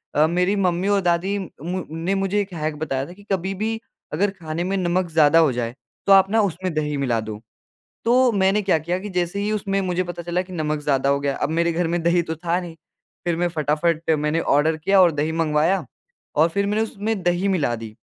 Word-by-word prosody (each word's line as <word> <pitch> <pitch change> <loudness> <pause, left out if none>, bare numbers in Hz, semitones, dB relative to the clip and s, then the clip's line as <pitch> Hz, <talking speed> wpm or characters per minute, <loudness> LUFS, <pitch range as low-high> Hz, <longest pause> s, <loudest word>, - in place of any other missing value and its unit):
अ, 150 +1 +5
मेरी 180 +4 +1
मम्मी 185 -1 0
और 200 -1 +3
दादी 180 +3 +1
म 180 0 -5
ने 165 +4 -1
मुझे 195 +1 0
एक 195 -2 -6
हैक 155 -1 -3
बताया 135 -4 -2
था 175 - -10
कि 205 +2 -17
कभी 190 +1 -1
भी 220 +3 -2 0.3
अगर 200 +7 +2
खाने 160 +1 -3
में 190 +2 -1
नमक 180 -1 0
ज़्यादा 160 0 +5
हो 155 -5 +4
जाए, 120 0 -3 0.3
तो 200 - +7
आप 195 0 +6
ना 225 - +4
उसमें 185 -2 -2
दही 150 -1 -1
मिला 125 -5 0
दो। 110 -1 -7 0.6
तो 250 +1 +4
मैंने 195 0 +2
क्या 190 -5 +2
किया 170 +4 -2
कि 205 +2 -7
जैसे 180 +1 -1
ही 205 +1 -1
उसमें 195 -2 -1
मुझे 185 -1 -1
पता 175 -1 -6
चला 175 +1 -1
कि 185 0 -10
नमक 155 -2 -1
ज़्यादा 140 -1 +1
हो 140 - +2
गया, 140 -1 -1
अब - - -2
मेरे 170 +1 +1
घर 170 0 0
में 170 0 -1
दही 170 +1 +3
तो 160 0 -4
था 170 +2 -1
नहीं, 175 -2 -8 0.5
फिर 175 -1 +1
मैं 175 +1 +1
फटाफट 160 +1 0
मैंने 150 +2 0
ऑर्डर 150 +2 +2
किया 195 +5 +3
और 175 - +5
दही 150 +1 -1
मँगवाया 160 +3 +1 0.5
और 160 +3 +4
फिर 200 +4 0
मैंने 210 +2 +1
उसमें 215 -1 -3
दही 175 +2 +1
मिला 170 -11 +1
दी 110 -1 -9
175 Hz, 230 wpm, -22 LUFS, 155-195 Hz, 0.6 s, तो